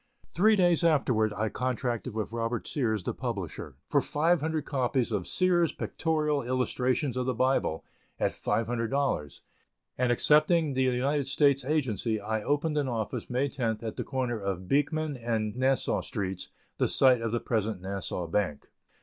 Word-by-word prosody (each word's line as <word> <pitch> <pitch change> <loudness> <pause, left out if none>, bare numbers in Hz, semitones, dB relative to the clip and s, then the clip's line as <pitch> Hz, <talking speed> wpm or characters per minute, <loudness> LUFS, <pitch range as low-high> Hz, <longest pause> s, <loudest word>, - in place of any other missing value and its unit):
Three 215 +6 +5
days 175 -3 +3
afterwards 125 -9 +3
I 110 0 0
contracted 125 -2 -2
with 110 -1 -3
Robert 115 0 -2
Sears, 110 - -1
the - - -2
publisher, 105 - -5
for - - +3
five 165 +4 +1
hundred 160 -1 -1
copies 130 -3 0
of 100 -5 -2
"Sears' 175 -3 +2
Pictorial 150 -3 -1
Illustrations 125 +1 0
of 125 0 -1
the 130 - 0
Bible," 130 -10 +1 0.3
at - - +1
$500, 115 - -1 0.6
and 125 -1 +2
accepting 155 +4 +3
the 130 - 0
United 130 +2 +1
States 140 -1 +3
agency, 125 -6 0
I 110 +1 -2
opened 150 +5 0
an 140 - -1
office, 115 -4 -3
May 130 +3 +1
10th, 115 -5 -2
at 110 - -4
the - - -3
corner 125 -4 -2
of 95 -2 -4
Beekman 145 - 0
and 115 -3 -2
Nassau 130 +1 +1
Streets, 95 -4 -4 0.3
the - - +3
site 130 -3 +4
of 115 -1 -2
the 120 - 0
present 110 -3 -1
Nassau 95 -1 -4
Bank. 85 -3 -2
125 Hz, 160 wpm, -28 LUFS, 110-145 Hz, 0.6 s, Three